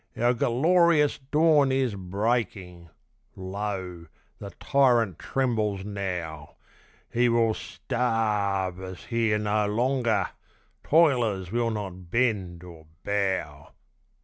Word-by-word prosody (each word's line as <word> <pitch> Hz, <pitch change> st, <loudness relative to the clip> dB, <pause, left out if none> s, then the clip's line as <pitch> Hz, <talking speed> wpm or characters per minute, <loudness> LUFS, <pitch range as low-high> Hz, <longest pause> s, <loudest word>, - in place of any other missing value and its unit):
Our 120 Hz, +1 st, +3 dB
gerlorious 155 Hz, +5 st, +3 dB
dawn 150 Hz, -3 st, +4 dB
is 130 Hz, -4 st, +1 dB
breaking! 95 Hz, -3 st, -3 dB, 0.5 s
Lo! 95 Hz, -3 st, -5 dB, 0.3 s
the 100 Hz, -, -7 dB
tyrant 120 Hz, -, +2 dB
trembles 110 Hz, -7 st, -1 dB
now! 90 Hz, -7 st, -5 dB, 0.6 s
He 120 Hz, +1 st, +3 dB
will 115 Hz, -1 st, +2 dB
sta 110 Hz, -6 st, -1 dB
a 90 Hz, -, -3 dB
rve 90 Hz, -, -14 dB
us 95 Hz, -1 st, -8 dB
here 115 Hz, -3 st, 0 dB
no 105 Hz, 0 st, 0 dB
longer! 115 Hz, -3 st, 0 dB, 0.5 s
toilers 120 Hz, -, +2 dB
will 120 Hz, 0 st, 0 dB
not 95 Hz, -5 st, -6 dB
bend 95 Hz, -7 st, 0 dB
or 80 Hz, -3 st, -13 dB, 0.2 s
bow! 95 Hz, -8 st, -2 dB
105 Hz, 105 wpm, -26 LUFS, 95-120 Hz, 0.6 s, dawn